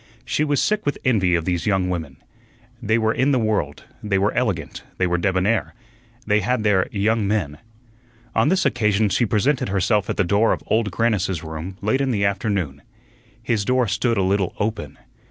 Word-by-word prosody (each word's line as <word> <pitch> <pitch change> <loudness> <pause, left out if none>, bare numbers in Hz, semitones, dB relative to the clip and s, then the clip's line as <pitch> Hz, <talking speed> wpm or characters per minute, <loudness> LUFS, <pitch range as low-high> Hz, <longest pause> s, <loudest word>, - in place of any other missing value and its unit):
She 120 +7 0
was 145 -2 +1
sick 210 0 +1
with 145 - -1
envy 95 -8 +3
of 85 -1 -1
these 90 +2 -1
young 95 -3 +1
women. 80 -7 -4 0.6
They 110 +2 +1
were 110 -1 +1
in 130 +3 +1
the 135 - +3
world, 105 - -1 0.2
they 100 -2 0
were 100 +2 +1
elegant, 95 - -2 0.2
they 90 - +1
were 90 -1 0
debonair, 95 +6 0 0.5
they 105 0 +3
had 110 +3 -1
their 100 -3 +2
"young 105 +1 +1
men." 85 -9 -1 0.7
On 115 +6 +2
this 190 -1 +2
occasion 110 -5 +2
she 110 +6 +1
presented 120 +5 +1
herself 100 +2 +1
at - - -2
the 95 - +3
door 100 +5 +2
of - - -5
Old 110 -1 +1
Grannis's 95 -4 0
room 80 +4 -7
late 130 +6 +1
in 135 - 0
the 100 -5 +1
afternoon. 95 -8 -1 0.6
His 115 -3 0
door 125 +2 +1
stood 115 +4 0
a 95 - +2
little 95 -1 0
open. 105 -9 -3
105 Hz, 190 wpm, -22 LUFS, 95-115 Hz, 0.7 s, envy